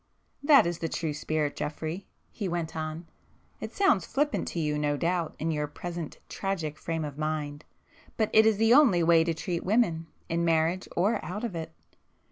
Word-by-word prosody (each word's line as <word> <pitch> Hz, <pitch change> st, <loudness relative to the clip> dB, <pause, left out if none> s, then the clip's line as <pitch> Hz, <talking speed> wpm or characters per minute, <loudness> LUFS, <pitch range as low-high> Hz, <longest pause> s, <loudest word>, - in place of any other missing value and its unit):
"That 285 Hz, -, +6 dB
is 170 Hz, -1 st, -2 dB
the 165 Hz, -, -2 dB
true 160 Hz, -2 st, -2 dB
spirit, 150 Hz, 0 st, -1 dB
Geoffrey,"—he 165 Hz, +6 st, -5 dB
went 170 Hz, -2 st, -3 dB
on—"It 160 Hz, +1 st, -8 dB
sounds 385 Hz, -, +3 dB
flippant 290 Hz, +2 st, 0 dB
to 170 Hz, -, -3 dB
you 150 Hz, -2 st, 0 dB
no 145 Hz, -1 st, 0 dB
doubt 170 Hz, +1 st, -1 dB
in 165 Hz, +1 st, -1 dB
your 150 Hz, -1 st, -1 dB
present 170 Hz, +1 st, -6 dB
tragic 170 Hz, -6 st, -3 dB
frame 165 Hz, -2 st, -2 dB
of 145 Hz, 0 st, -7 dB
mind,—but 155 Hz, -, -4 dB
it 220 Hz, 0 st, +7 dB
is 220 Hz, -2 st, +3 dB
the 225 Hz, +2 st, +5 dB
only 240 Hz, -, +6 dB
way 165 Hz, 0 st, +5 dB
to 165 Hz, 0 st, -1 dB
treat 170 Hz, +2 st, -3 dB
women, 180 Hz, -6 st, +1 dB, 0.2 s
in 170 Hz, +1 st, 0 dB
marriage 165 Hz, +2 st, +1 dB
or 205 Hz, +5 st, +1 dB
out 185 Hz, +8 st, -5 dB
of 235 Hz, -, -2 dB
it. 160 Hz, -1 st, -5 dB
165 Hz, 170 wpm, -28 LUFS, 155-195 Hz, 0.2 s, it